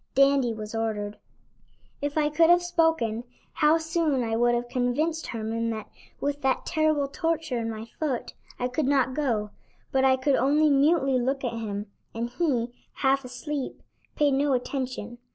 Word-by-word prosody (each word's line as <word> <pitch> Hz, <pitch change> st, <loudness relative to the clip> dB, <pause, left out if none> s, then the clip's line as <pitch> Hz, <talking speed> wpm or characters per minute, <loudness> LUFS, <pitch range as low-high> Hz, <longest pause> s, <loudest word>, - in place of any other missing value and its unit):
Dandy 275 Hz, -2 st, +4 dB
was 215 Hz, -1 st, -6 dB
ordered. 210 Hz, -2 st, -2 dB, 0.8 s
If 290 Hz, +1 st, -2 dB
I 300 Hz, -1 st, +3 dB
could 325 Hz, +2 st, +4 dB
have 350 Hz, 0 st, +6 dB
spoken, 325 Hz, -10 st, +1 dB, 0.3 s
how 305 Hz, +2 st, +4 dB
soon 320 Hz, -5 st, 0 dB
I 225 Hz, -1 st, -1 dB
would 240 Hz, +1 st, +3 dB
have 240 Hz, 0 st, -2 dB
convinced 260 Hz, +6 st, -1 dB
Herman 230 Hz, 0 st, -2 dB
that, 220 Hz, -2 st, -5 dB, 0.3 s
with 285 Hz, 0 st, -2 dB
that 265 Hz, -1 st, +1 dB
terrible 310 Hz, -3 st, +1 dB
torture 320 Hz, -4 st, -1 dB
in 230 Hz, 0 st, -2 dB
my 220 Hz, 0 st, -5 dB
foot, 285 Hz, -6 st, -2 dB, 0.2 s
I 250 Hz, -, -1 dB
could 260 Hz, +3 st, -1 dB
not 270 Hz, -2 st, +2 dB
go, 230 Hz, -8 st, -1 dB, 0.4 s
but 265 Hz, 0 st, +2 dB
I 265 Hz, -1 st, +5 dB
could 270 Hz, +2 st, +1 dB
only 295 Hz, +4 st, +3 dB
mutely 275 Hz, -2 st, +3 dB
look 270 Hz, +3 st, -1 dB
at 245 Hz, -, -1 dB
him, 210 Hz, -3 st, -4 dB, 0.3 s
and 235 Hz, +1 st, -3 dB
he, 250 Hz, -6 st, 0 dB, 0.3 s
half 270 Hz, +1 st, +3 dB
asleep, 270 Hz, +2 st, -5 dB, 0.3 s
paid 295 Hz, -1 st, +3 dB
no 280 Hz, +1 st, +2 dB
attention. 250 Hz, -2 st, -3 dB
265 Hz, 165 wpm, -26 LUFS, 235-300 Hz, 0.8 s, have